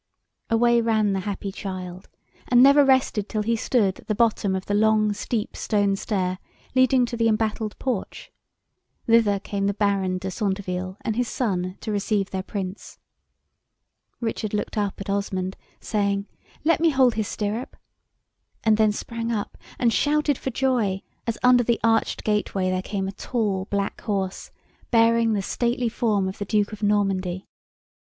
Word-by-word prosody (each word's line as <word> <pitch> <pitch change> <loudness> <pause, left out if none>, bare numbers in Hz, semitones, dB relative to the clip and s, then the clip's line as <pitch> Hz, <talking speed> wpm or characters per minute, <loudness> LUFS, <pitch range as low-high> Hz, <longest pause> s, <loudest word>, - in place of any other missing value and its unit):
Away 235 +1 +4
ran 220 -3 +2
the 195 - 0
happy 200 0 -4
child, 185 -1 -7 0.4
and 245 0 +6
never 280 +2 +7
rested 260 -6 +2
till 215 -1 -1
he 230 +2 +1
stood 220 -4 +1
at - - -17
the 215 - 0
bottom 215 -3 +2
of 190 - -4
the 205 - -2
long, 215 0 +3
steep, 215 +1 -3
stone 205 -2 +1
stair, 185 -3 -2 0.3
leading 255 0 +4
to 240 - -5
the 230 -1 +2
embattled 220 -1 -1
porch. 250 -7 -4 0.7
Thither 225 -3 +4
came 200 0 -2
the 200 - 0
Baron 195 -3 +1
de 190 +1 -4
Centeville, 185 -2 -3
and 220 - -2
his 245 0 0
son, 185 -7 -2
to 220 - -4
receive 205 -1 0
their 190 - -2
Prince. 190 0 -6 1.2
Richard 220 -2 -2
looked 210 - -3
up 205 -2 -1
at 200 - -6
Osmond, 195 -2 -2 0.2
saying, 200 -1 -1 0.4
"Let 330 +2 +3
me 330 0 +4
hold 260 -4 +4
his 215 -2 -2
stirrup," 215 +4 -4 0.9
and 220 -1 +4
then 215 -1 +4
sprang 230 +2 -4
up 210 -3 -3 0.2
and 235 -2 +2
shouted 300 0 +2
for 265 - -4
joy, 230 -7 0 0.2
as 230 - -1
under 250 0 +6
the 235 0 +1
arched 225 0 +1
gateway 200 -3 0
there 185 0 0
came 195 0 -3
a - - -3
tall 200 -3 -2
black 200 0 -2
horse, 195 -3 -3 0.4
bearing 230 -1 +4
the 200 -2 -1
stately 240 +3 0
form 215 -4 0
of 190 - -6
the 205 - -3
Duke 210 +1 0
of 215 - -8
Normandy. 195 -3 0
210 Hz, 165 wpm, -24 LUFS, 195-230 Hz, 1.2 s, never